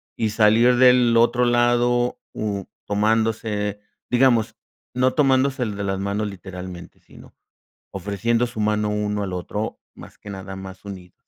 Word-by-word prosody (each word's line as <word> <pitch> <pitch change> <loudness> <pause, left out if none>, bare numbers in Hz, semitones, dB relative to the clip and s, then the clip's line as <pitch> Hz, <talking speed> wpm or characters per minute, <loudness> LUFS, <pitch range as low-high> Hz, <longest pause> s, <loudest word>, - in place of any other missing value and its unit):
y 110 - 0
salir 110 +3 +4
del 125 -2 +5
otro 120 +1 +3
lado, 120 0 +2
mm, 100 -2 -3 0.2
tomándose, 105 -1 0 0.3
digamos, 120 -3 +3 0.4
no 130 +1 +2
tomándose 135 -2 +2
el 105 -4 -3
de 100 - -3
las 95 0 -2
manos 100 +2 -2
literalmente, 90 -3 -9
sino - - -17 0.6
ofreciendo 105 +5 -1
su 115 -2 -9
mano 105 0 +1
uno 105 0 -1
al 95 -2 -4
otro, 105 +4 -4 0.2
más - - -13
que 105 - -12
nada 95 -1 -7
más 95 +1 -10
unidos? 95 -3 -10
105 Hz, 145 wpm, -22 LUFS, 100-120 Hz, 0.6 s, del